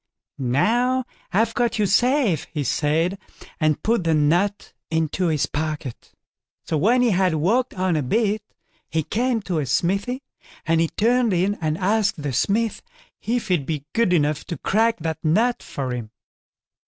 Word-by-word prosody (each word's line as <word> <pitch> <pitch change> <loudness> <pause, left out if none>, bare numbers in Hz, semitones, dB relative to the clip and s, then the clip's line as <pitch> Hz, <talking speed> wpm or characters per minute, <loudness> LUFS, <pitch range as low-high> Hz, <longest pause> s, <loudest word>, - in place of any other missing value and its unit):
"Now, 240 - +1 0.3
I've 225 +4 +2
got 240 -2 0
you 210 - +2
safe", 240 - +2
he 150 -2 -2
said, 160 +8 0 0.4
and 155 -2 +1
put 225 -4 +1
the 165 -1 +2
nut 175 +7 +1 0.2
into 160 +3 0
his 155 -3 +1
pocket. 150 -5 -5 0.5
So - - -2
when 235 - +3
he 240 - +3
had 185 -3 +2
walked 225 +12 +1
on 185 -2 0
a 155 - +1
bit, 210 - 0 0.5
he 160 -1 0
came 230 - -1
to 175 -5 -1
a 145 - -1
smithy, 200 - 0 0.4
and 165 0 +2
he 165 - +2
turned 235 +3 +2
in 185 +3 +2
and 155 -1 0
asked 200 -3 +1
the 140 -3 -2
smith 215 - 0 0.4
if 235 -1 -2
he'd 170 -7 +1
be 150 -3 -3
good 230 -5 +2
enough 150 -3 +1
to 170 - -5
crack 225 +3 +1
that 160 0 -3
nut 220 +10 +2
for 130 -3 -4
him. 120 -3 -5
180 Hz, 165 wpm, -23 LUFS, 155-225 Hz, 0.5 s, when